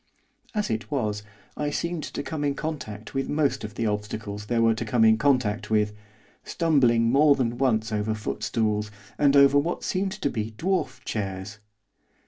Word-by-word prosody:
As 210 - 0
it 110 +1 -3
was 110 -8 -1 0.3
I 150 0 -1
seemed 170 +2 -2
to - - -5
come 155 -2 -4
into 140 -1 -1
contact 110 -9 -5
with 135 -1 -2
most 140 -4 +1
of 105 - -7
the 115 - -1
obstacles 105 0 -4
there 120 0 +1
were 115 0 +5
to 110 - -3
come 120 -3 +3
into 110 0 +5
contact 125 -6 +1
with, 105 -1 +2 0.5
stumbling 120 -8 +2
more 145 +2 +5
than 120 -3 -1
once 115 -4 +1
over 105 +1 -1
footstools, 105 0 -1 0.3
and 145 -1 +4
over 140 0 +7
what 170 +5 -2
seemed 190 +1 -1
to 190 -9 -2
be 110 -1 -4
dwarf 165 -8 -1
chairs. 100 -1 -4
115 Hz, 170 wpm, -26 LUFS, 105-145 Hz, 0.5 s, over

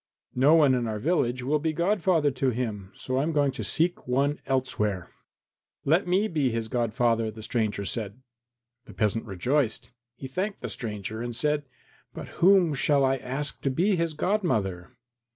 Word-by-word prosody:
No 140 +5 +5
one 145 -5 +5
in 120 -2 0
our 110 -1 -2
village 125 -2 0
will 150 +4 +1
be 160 +1 -1
godfather 170 -3 +2
to 130 +1 0
him, 110 -6 -4
so 130 0 -3
I - - +3
am 155 +3 0
going 145 -3 +2
to 135 - -6
seek 170 -2 +1
one 140 +4 +1
elsewhere." 105 -8 -1 0.7
"Let 165 +6 +3
me 190 +4 +2
be 150 -8 0
his 115 -1 -3
godfather," 115 -1 +1
the 110 0 -9
stranger 110 -3 -1
said. 110 +1 -4 0.7
The - - -13
peasant 110 +1 0
rejoiced. 120 +4 -1 0.2
He 135 - -9
thanked 190 +9 -3
the - - -4
stranger 110 -1 -5
and 120 -1 -4
said, 150 +2 0 0.5
"But - - -7
whom 180 -3 +5
shall 140 0 +2
I 135 0 +2
ask 135 +3 -3
to 135 - 0
be 185 +10 +2
his 165 -2 -1
godmother?" 125 - -1
130 Hz, 170 wpm, -27 LUFS, 115-155 Hz, 0.7 s, No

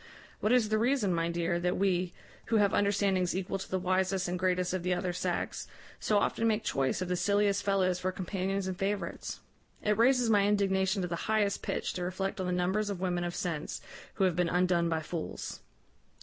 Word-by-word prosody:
What 215 - +1
is 245 -4 +4
the 215 0 +2
reason, 235 -5 +2
my 165 0 0
dear, 170 0 0
that 180 +1 0
we, 185 -2 +1 0.3
who 230 - 0
have 205 -2 +4
understandings 200 -3 +2
equal 190 +1 -2
to 190 - -7
the 190 - 0
wisest 185 +1 0
and 180 +1 -2
greatest 180 0 +1
of 185 - -1
the 180 +1 +1
other 180 0 -2
sex, - - -2 0.3
so 210 - +2
often 225 +2 +1
make 220 0 +1
choice 135 +6 0
of - - -5
the 180 - 0
silliest 200 +1 +2
fellows 190 -3 +1
for 185 0 -1
companions 190 +1 -2
and 185 -1 -3
favourites? 200 +2 -3 0.4
It 210 0 +2
raises 245 +2 +4
my 205 -2 +4
indignation 190 -1 +1
to - - -1
the 170 - -2
highest 210 -2 +2
pitch - - -2
to 180 - -3
reflect 195 +3 -3
on 185 - -2
the - - 0
numbers 190 +4 0
of 200 -3 -3
women 180 -1 -1
of 175 0 -3
sense 160 -4 -3 0.4
who 195 - +1
have 185 -3 +3
been 175 -1 +1
undone 180 -1 +2
by 160 -1 0
fools." 165 +1 -5
185 Hz, 205 wpm, -30 LUFS, 180-205 Hz, 0.4 s, is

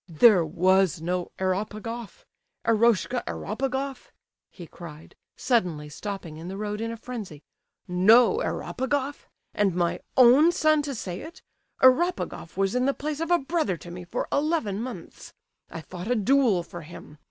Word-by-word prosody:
"There 180 +2 +6
was 185 +2 +2
no 175 +2 -3
Eropegoff? 215 - -4 0.4
Eroshka 235 +2 +2
Eropegoff?" 265 +4 -4 0.4
he 175 - -11
cried, 165 -2 -12 0.2
suddenly, 180 - 0
stopping 185 -1 -7
in 165 +2 -8
the 190 +1 -6
road 210 +1 -4
in 230 0 -3
a 230 - -6
frenzy. 215 - -8 0.4
"No 220 - +5
Eropegoff! 285 - -3 0.3
And 195 -4 +1
my 175 -1 0 0.2
own 260 +7 +7
son 310 -3 +3
to 285 -2 -4
say 185 -4 -5
it! 340 +3 -11 0.4
Eropegoff 260 - +2
was 195 0 +1
in 250 +1 +1
the 275 - +1
place 300 0 -4
of 330 0 -3
a 350 - +5
brother 275 - -1
to 175 - -11
me 180 +1 -8
for 175 - -4
eleven 285 - 0
months. 235 -9 -9 0.3
I 165 - -7
fought 180 +5 -8
a 245 - +2
duel 230 -4 +3
for 175 0 -9
him. 150 -2 -12
215 Hz, 155 wpm, -26 LUFS, 180-265 Hz, 0.4 s, own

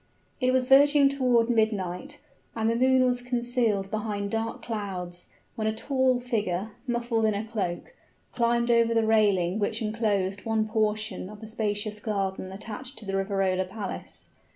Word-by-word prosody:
It 255 -2 +2
was 255 -1 +2
verging 280 +2 +6
toward 250 -4 +2
midnight, 220 +3 -1 0.4
and 220 -1 0
the 230 - +2
moon 260 +1 +4
was 245 -1 +1
concealed 240 -5 0
behind 205 -2 -2
dark 225 +2 -3
clouds, 185 -5 -5 0.2
when 215 -1 -2
a 220 - 0
tall 260 +1 +1
figure, 215 -5 -2 0.2
muffled 235 -2 0
in 215 -1 +2
a 205 +2 -3
cloak, 210 - -4 0.4
climbed 235 0 +1
over 230 0 +3
the 225 -1 +3
railing 205 -4 +3
which 215 +2 0
inclosed 210 -4 -1
one 220 -1 0
portion 215 -3 -1
of 210 0 -11
the 220 - -9
spacious 210 -1 -2
garden 195 -3 -2
attached 225 +7 -7
to 215 - -8
the 195 - -4
Riverola 195 -1 0
Palace. 195 +1 -7
220 Hz, 155 wpm, -27 LUFS, 200-240 Hz, 0.4 s, verging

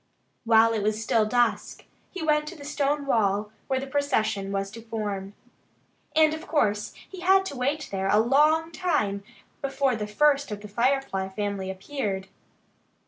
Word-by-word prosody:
While 225 0 +5
it 220 - -1
was 215 +1 0
still 220 0 +2
dusk 240 +2 0 0.2
he 375 - -6
went 300 -1 +2
to 360 - -7
the 285 -3 -11
stone 285 0 0
wall 210 -4 +1 0.2
where 265 -1 0
the 270 - -4
procession 220 -8 0
was 195 0 -2
to 230 +2 -9
form. 205 -3 -4 0.8
And 310 -1 +5
of 315 +2 -7
course 210 -9 0
he 380 - -10
had 380 +2 +4
to 330 - -5
wait 280 +4 -1
there 195 -1 -1
a 210 - +4
long 300 +8 +3
time 210 - -1 0.4
before 270 -2 0
the 210 -1 -4
first 285 +6 +2
of 210 -1 -5
the 210 - -8
Firefly 235 -3 0
family 200 -1 -3
appeared. 195 -1 -4
230 Hz, 165 wpm, -26 LUFS, 205-290 Hz, 0.8 s, While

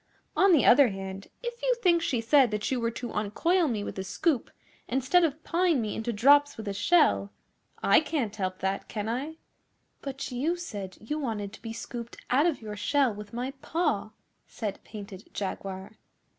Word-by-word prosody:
On 390 0 +5
the 315 -6 +5
other 265 +2 +7
hand, 195 -1 -6 0.2
if 480 0 -5
you - - +2
think 360 -8 +3
she 250 -8 0
said 260 +2 +5
that 210 +2 -2
you 260 - +1
were 230 0 0
to 240 +1 -6
uncoil 325 - +1
me 220 -6 -1
with 195 - -5
a - - -2
scoop, 260 - 0 0.4
instead 270 +8 +3
of 315 -1 -1
pawing 340 -4 +2
me 215 -3 -2
into 225 +2 -2
drops 285 +6 +5
with 220 -1 -7
a 200 - -1
shell, 250 - +3 0.5
I - - +6
can't 290 -9 -2
help 185 -3 -2
that, 190 +1 -1
can 210 -1 -4
I?' 275 +8 -3 0.6
'But 275 -1 -5
you 285 +8 0
said 205 - -7
you 300 +8 -4
wanted 215 -7 -3
to - - -12
be 225 - -6
scooped 235 +1 -7
out 285 +6 +4
of 300 -9 -1
your 210 -1 -5
shell 265 +3 +2
with 205 0 -9
my 245 +3 -3
paw,' 300 - 0 0.4
said 210 -4 -5
Painted 200 -2 -10
Jaguar. 195 +1 -5
240 Hz, 185 wpm, -28 LUFS, 210-300 Hz, 0.6 s, other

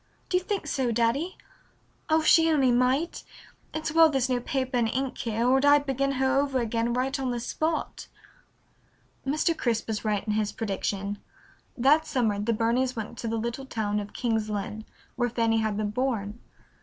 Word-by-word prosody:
"Do 360 - +3
you 365 - -2
think 400 +1 -2
so, 260 -4 0
Daddy? 240 +10 0 0.7
Oh, 315 0 +4
if - - -6
she 325 0 +6
only 275 -5 +3
might! 255 +7 +1 0.5
It's 315 0 -3
well 325 0 +6
there's 265 -3 0
no 250 - +2
paper 260 +1 -2
and 230 -2 +2
ink 265 +2 -2
here 230 +1 -1
or 265 +2 +4
I'd 285 0 +5
begin 275 0 0
her 265 +1 +2
over 275 -2 0
again 230 0 -1
right 265 +3 -1
on 265 -1 -1
the 240 -1 -2
spot." 315 +6 -3 1.2
Mr. 310 +4 +1
Crisp 230 -6 -1
was 220 -2 -3
right 210 -2 -1
in 210 - -1
his 210 -1 -1
prediction. 200 -1 -3 0.6
That 295 +6 +4
summer 220 -6 0
the 210 +3 0
Burneys 235 +3 +1
went 225 +1 -5
to 230 - -4
the 225 0 -1
little 235 +4 -4
town 210 -4 -1
of 205 0 -6
King's 225 -3 -1
Lynn, 210 +1 -4 0.3
where 245 -1 +1
Fanny 230 -1 +1
had 215 -2 0
been 210 -1 -1
born. 225 -3 -2
245 Hz, 185 wpm, -27 LUFS, 220-275 Hz, 1.2 s, she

